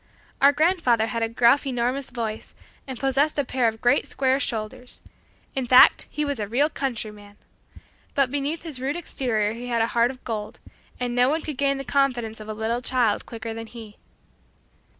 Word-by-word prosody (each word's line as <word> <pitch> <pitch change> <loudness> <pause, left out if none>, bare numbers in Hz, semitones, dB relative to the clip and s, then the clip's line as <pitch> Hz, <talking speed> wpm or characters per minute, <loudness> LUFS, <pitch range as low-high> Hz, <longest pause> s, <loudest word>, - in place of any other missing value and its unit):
Our 280 +1 +7
grandfather 295 -7 +2
had 230 0 -3
a 225 - 0
gruff 240 +5 +3
enormous 255 +1 -1
voice 225 -3 -5 0.3
and 260 -3 -6
possessed 275 +3 +1
a 285 - +1
pair 250 -1 +1
of 220 0 -3
great 240 - +3
square 265 0 +1
shoulders; 245 0 -4 0.5
in 265 -2 -2
fact, 255 +1 +7
he 300 0 -2
was 285 -4 -2
a 205 - -2
real 280 +8 +1
"countryman." 210 -7 -5 0.8
But 275 -3 +2
beneath 290 +3 -2
his 300 -7 -5
rude 275 +3 -1
exterior 225 -10 -1
he 240 +2 -7
had 235 -2 +1
a 230 - -3
heart 235 0 +3
of 255 0 -10
gold, 215 -3 -5 0.4
and 245 -1 -2
no 250 +1 +3
one 315 +3 0
could 300 -4 -6
gain 275 -1 +2
the 275 - -5
confidence 245 -4 0
of 215 0 -9
a - - -3
little 225 +3 -2
child 245 -5 +1
quicker 225 -1 -6
than 225 0 -7
he. 220 -3 -11
245 Hz, 190 wpm, -24 LUFS, 225-275 Hz, 0.8 s, Our